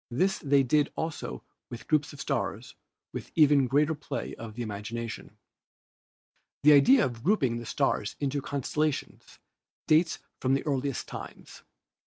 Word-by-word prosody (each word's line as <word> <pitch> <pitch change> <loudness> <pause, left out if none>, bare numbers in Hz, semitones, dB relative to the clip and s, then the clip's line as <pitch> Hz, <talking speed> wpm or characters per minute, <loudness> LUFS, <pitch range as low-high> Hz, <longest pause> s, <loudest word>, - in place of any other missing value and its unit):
This 185 +11 +1
they 140 -1 +3
did 145 +3 +2
also 160 -1 -4 0.3
with 120 - -9
groups 155 -1 +1
of 145 - -12
stars - - -3 0.4
with - - -7
even 145 -4 +5
greater 150 +4 +2
play 150 -1 -5
of 110 -2 -9
the 120 - -3
imagination. 110 +1 -6 1.3
The 150 +1 +8
idea 210 - +6
of 120 -2 -6
grouping 135 - +2
the 120 - -8
stars - - 0
into 140 0 -1
constellations 145 +2 -3 0.5
dates 160 +1 +3 0.2
from 130 +1 +2
the 135 - -2
earliest 140 -3 -2
times. - - -9
140 Hz, 140 wpm, -28 LUFS, 120-150 Hz, 1.3 s, The